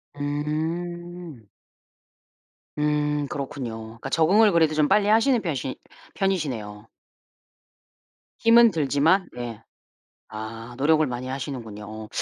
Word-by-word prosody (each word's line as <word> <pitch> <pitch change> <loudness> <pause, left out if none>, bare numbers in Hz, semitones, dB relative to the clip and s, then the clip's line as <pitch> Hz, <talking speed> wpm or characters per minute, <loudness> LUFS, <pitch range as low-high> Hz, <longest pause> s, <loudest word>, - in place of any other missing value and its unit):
음. 160 0 -4 1.3
음. 150 -1 0
그렇군요. 135 -5 -5
그러니까 115 +4 -8
적응을 200 +8 +4
그래도 160 -3 +3
좀 150 -1 +3
빨리 205 -1 +3
하시는 230 +4 +4
편이시 135 -8 -3 0.4
편이시네요. 120 - -2 1.5
힘은 230 0 +6
들지만 160 +4 +2
예. 120 -3 -6 0.7
아 115 +2 -7
노력을 155 +3 +3
많이 125 0 -5
하시는군요. 125 -6 -6
오. 110 0 -8
150 Hz, 235 characters per minute, -24 LUFS, 120-175 Hz, 1.5 s, 힘은